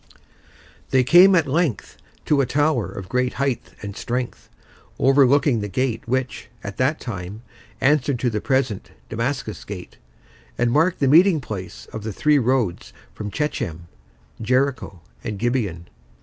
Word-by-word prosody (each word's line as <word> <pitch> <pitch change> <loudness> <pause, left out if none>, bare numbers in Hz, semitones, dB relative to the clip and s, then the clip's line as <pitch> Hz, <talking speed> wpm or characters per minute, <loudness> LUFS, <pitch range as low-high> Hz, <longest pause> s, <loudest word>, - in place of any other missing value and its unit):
They 130 -1 +3
came, 180 +8 +7
at 165 -4 +3
length, 150 - -1 0.3
to 145 -2 +3
a 130 - 0
tower 145 -5 +1
of 95 -2 -8
great 125 +3 0
height 135 -3 -1 0.2
and 100 -1 -6
strength, 125 0 -4 0.5
overlooking 135 -1 +4
the 105 - -3
gate 120 +4 -1
which, 130 +1 -2 0.2
at 100 -1 -7
that 135 +5 +1
time, 100 -1 -7 0.4
answered 140 -1 +2
to 125 - +1
the 105 -1 -2
present 130 -6 -1 0.2
Damascus 115 -1 -3
Gate, 95 -3 -9 0.6
and 120 - +1
marked 160 +6 +2
the 140 - +3
meeting 165 +4 +6
place 95 -8 -7
of 110 - -5
the 110 +1 -4
three 150 +6 +3
roads 125 -7 0 0.2
from 105 -1 -6
Shechem, 85 - -3 0.5
Jericho, 125 -6 0 0.2
and 105 -3 -4
Gibeon. 105 -8 -1
125 Hz, 145 wpm, -22 LUFS, 105-140 Hz, 0.6 s, came